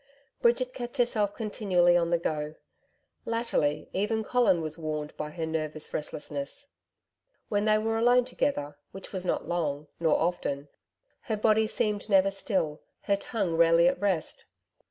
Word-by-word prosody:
Bridget 250 +2 +2
kept 245 +2 -6
herself 215 -5 +1
continually 190 -5 +2
on 170 -1 +2
the 170 - +3
go. 155 -2 -3 0.7
Latterly, 230 -11 0
even 220 +3 0
Colin 240 -6 +3
was 155 -1 -4
warned 155 -2 -4
by 150 - -4
her 160 +1 -4
nervous 155 -1 -4
restlessness. 150 - -5 0.8
When 205 0 +1
they 215 0 +4
were 225 +1 0
alone 245 +1 +5
together, 145 - -2
which 195 - -9
was 185 -1 -3
not - - 0
long, 150 -4 -2
nor 165 -2 +3
often, 145 -4 -1 0.6
her 220 - -1
body 220 +1 +3
seemed 210 -1 -1
never 195 -1 +5
still, 190 -6 -2 0.2
her 200 - +2
tongue 200 -4 -2
rarely 170 +1 +6
at 180 +1 +1
rest. 190 -6 -1
185 Hz, 150 wpm, -28 LUFS, 155-220 Hz, 0.8 s, rarely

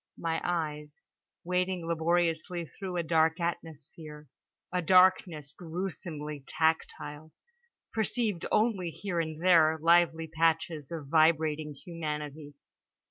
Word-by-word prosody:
My 165 -1 -2
eyes, 150 -4 -3 0.4
wading 180 0 -1
laboriously 170 +1 0
through 185 +2 -6
a 170 - 0
dark 160 +1 +2
atmosphere, 155 -2 -6 0.5
a 180 - +1
darkness 180 -4 +4
gruesomely 160 -4 -6
tactile, 160 -1 -2 0.6
perceived 220 -4 -1
only 210 -6 +1
here 175 +1 -4
and 160 -1 -3
there 165 -3 +5
lively 165 0 +3
patches 160 -2 0
of 160 -4 -5
vibrating 155 -1 +2
humanity. 150 -2 -6
165 Hz, 100 wpm, -29 LUFS, 155-175 Hz, 0.6 s, there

